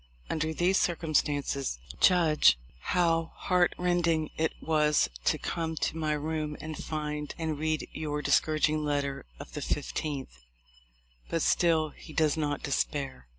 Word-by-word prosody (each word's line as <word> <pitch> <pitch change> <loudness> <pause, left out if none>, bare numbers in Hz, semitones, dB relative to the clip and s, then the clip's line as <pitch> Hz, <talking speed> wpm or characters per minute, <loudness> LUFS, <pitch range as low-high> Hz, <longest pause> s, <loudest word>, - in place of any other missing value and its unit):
Under 160 0 0
these 175 +4 +2
circumstances 145 - 0 0.2
judge 160 - +5 0.2
how 165 - +1
heart 180 -2 +2
rending 170 -3 +1
it 160 0 +1
was 150 -1 +2
to - - +3
come 165 -1 -3
to 160 - -1
my 155 -1 0
room 150 0 -2
and 155 0 -6
find 150 -1 -4
and 160 -3 -2
read 155 -1 -1
your 150 -1 -3
discouraging 155 0 +2
letter 140 - -2
of - - -10
the - - -4
15th." 140 - -3 0.9
But 165 - 0
still 160 -3 +3
he 155 +2 -13
does 155 -2 +2
not 145 -2 -2
despair. 135 - -2
155 Hz, 135 wpm, -29 LUFS, 150-165 Hz, 0.9 s, judge